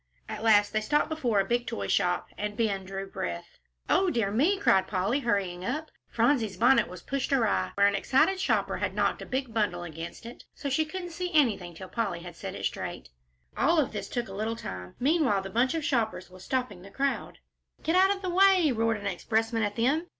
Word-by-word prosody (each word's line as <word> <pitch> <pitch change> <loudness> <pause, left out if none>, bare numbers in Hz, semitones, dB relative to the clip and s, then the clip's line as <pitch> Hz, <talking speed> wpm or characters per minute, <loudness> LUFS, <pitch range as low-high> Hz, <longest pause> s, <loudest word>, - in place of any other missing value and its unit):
At - - -6
last 205 -2 +4
they 215 - +1
stopped 295 +8 +1
before 250 -10 0
a 195 - +2
big 240 +3 0
toy 100 - -3
shop, 180 - +1
and 210 0 -4
Ben 200 -4 0
drew 195 +1 -5
breath. 85 - -6 0.3
"O 380 -1 +3
dear 225 - 0
me!" 305 - +2
cried 190 - +3
Polly, 200 +7 0
hurrying 195 -8 -1
up. 300 +10 -3 0.2
Phronsie's 230 -5 +1
bonnet 250 +5 +4
was 180 -2 -10
pushed 275 0 -2
awry 240 -6 +2
where 200 - +4
an 200 - +4
excited 270 - +2
shopper - - 0
had - - -2
knocked - - 0
a - - -8
big 260 -3 -3
bundle 185 -6 0
against 165 +4 -8
it, 235 - -10
so 285 - -4
she 315 +4 +2
couldn't 355 +2 -6
see 360 +2 -4
anything 200 - +2
till 185 +3 -8
Polly 195 -6 -2
had 175 -1 -9
set - - -6
it - - -4
straight. 65 - -4 0.5
All 330 -4 +3
this 200 -4 -6
took 240 -1 -3
a 195 - -9
little 220 +3 -2
time; 90 - -7
meanwhile 265 - +2
the 195 - -7
bunch 250 +8 +2
of 320 -2 -2
shoppers 220 - -1
was 185 0 -13
stopping 250 -8 -2
the 195 - -12
crowd. 275 +6 -2 0.5
"Get 325 - +1
out 380 +1 +6
of 395 -1 -1
the 370 - -1
way," 375 -4 +5
roared 225 -1 +1
an 205 - -9
expressman 225 +4 0
at 205 -1 -1
them. 280 +9 +1
225 Hz, 215 wpm, -28 LUFS, 195-280 Hz, 0.5 s, out